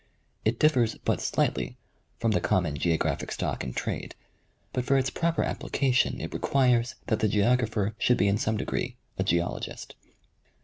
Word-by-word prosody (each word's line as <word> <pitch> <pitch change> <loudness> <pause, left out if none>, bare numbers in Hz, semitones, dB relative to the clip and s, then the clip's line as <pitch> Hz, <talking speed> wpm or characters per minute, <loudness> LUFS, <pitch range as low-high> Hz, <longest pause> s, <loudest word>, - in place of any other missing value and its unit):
It 110 +2 +1
differs 125 -7 +3
but - - +1
slightly - - 0 0.4
from 115 - +1
the 90 - +2
common 85 -6 +1
geographic 80 +2 0
stock - - -2
in 65 - -4
trade, - - -4 0.6
but 125 - 0
for 135 +2 +3
its 135 0 +1
proper 170 -1 0
application 130 -2 +1
it - - -5
requires 125 -3 +2
that 110 - 0
the 110 - +2
geographer 110 0 +2
should 125 - +3
be 100 - +3
in 100 +1 +2
some 110 -1 0
degree - - -2 0.2
a - - +3
geologist. 85 +1 -2
115 Hz, 160 wpm, -27 LUFS, 100-125 Hz, 0.6 s, differs